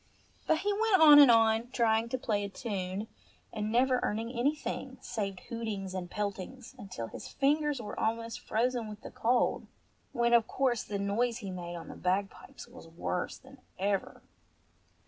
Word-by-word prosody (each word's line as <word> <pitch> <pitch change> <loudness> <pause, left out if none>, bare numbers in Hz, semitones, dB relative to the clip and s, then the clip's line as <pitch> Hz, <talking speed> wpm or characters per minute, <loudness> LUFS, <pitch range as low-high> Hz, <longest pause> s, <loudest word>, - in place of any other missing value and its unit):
But 315 -1 +2
he 410 +1 +1
went 430 -1 +3
on 300 -2 +10
and 285 -3 +9
on, 225 0 +4
trying 230 -2 +2
to 260 - -1
play 210 -4 -1
a 200 - -4
tune, 195 -2 -4 0.5
and 215 -1 -2
never 250 +2 +3
earning 225 +3 -2
anything, 265 +1 -2
save 200 -6 -4
hootings 215 -5 -4
and 180 -2 -4
peltings, 205 +5 -5
until 180 - -6
his - - -9
fingers 295 0 +1
were 215 -3 -6
almost 230 +1 -2
frozen 240 +1 -1
with 210 0 -9
the - - -9
cold, 240 +2 +1 0.4
when 235 -2 +1
of 235 -2 +5
course 255 -4 +1
the 205 - -4
noise 220 +4 0
he 200 -6 -6
made 175 -1 -6
on 170 - -8
the - - -9
bagpipes 190 +2 -3
was - - -13
worse 170 +2 -3
than 265 0 -16 0.2
ever. 195 0 -2
225 Hz, 165 wpm, -31 LUFS, 200-255 Hz, 0.5 s, on